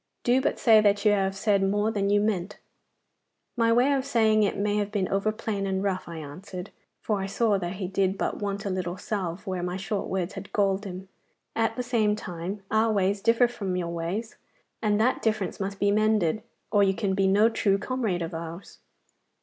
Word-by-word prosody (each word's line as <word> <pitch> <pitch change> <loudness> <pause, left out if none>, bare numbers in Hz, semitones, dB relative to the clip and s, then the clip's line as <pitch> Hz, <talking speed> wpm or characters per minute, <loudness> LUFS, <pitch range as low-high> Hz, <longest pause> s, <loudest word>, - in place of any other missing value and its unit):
Do 250 +2 +3
but - - 0
say 220 -3 +6
that 205 0 +2
you 210 - +6
have 195 -1 +1
said 200 0 +2
more 205 +3 +1
than 200 -2 0
you 205 0 +4
meant.' 205 -2 -1 1.0
'My 230 -1 +3
way 250 +5 +4
of 270 -1 +1
saying 220 -5 +3
it 205 - +1
may 205 +1 0
have 205 -1 -1
been 200 -3 0
over 195 +2 +1
plain 205 -2 -3
and 190 0 -1
rough,' 190 -2 -2
I 170 -1 -7
answered, 180 +5 -8 0.3
for 210 -3 0
I 195 - -2
saw 205 0 +1
that 175 -1 -3
he 190 -1 -4
did 190 0 0
but - - -2
want 200 0 -3
a 200 - -1
little 180 -1 -3
salve 190 -2 -4
where 185 -3 -3
my 180 +1 -3
short 195 +1 -3
words 190 0 -2
had 200 - -8
galled 200 0 +1
him. 190 0 -7 0.5
'At 225 0 +1
the 250 - -2
same 225 -4 +1
time, 185 0 -6
our 220 +1 +3
ways 200 -1 +1
differ 230 +3 +4
from 200 -6 -4
your 175 -2 -2
ways, 170 +7 -4 0.4
and 210 -1 +2
that 245 +4 +2
difference 215 -3 -1
must 200 0 -3
be 200 0 +3
mended, 215 -3 +2 0.3
or 205 - +4
you 195 -1 +3
can 200 -3 -1
be 195 0 +2
no 205 +3 +5
true 205 -3 +1
comrade 215 -7 -2
of 165 - -5
ours. 165 +3 -8
200 Hz, 210 wpm, -26 LUFS, 190-215 Hz, 1.0 s, say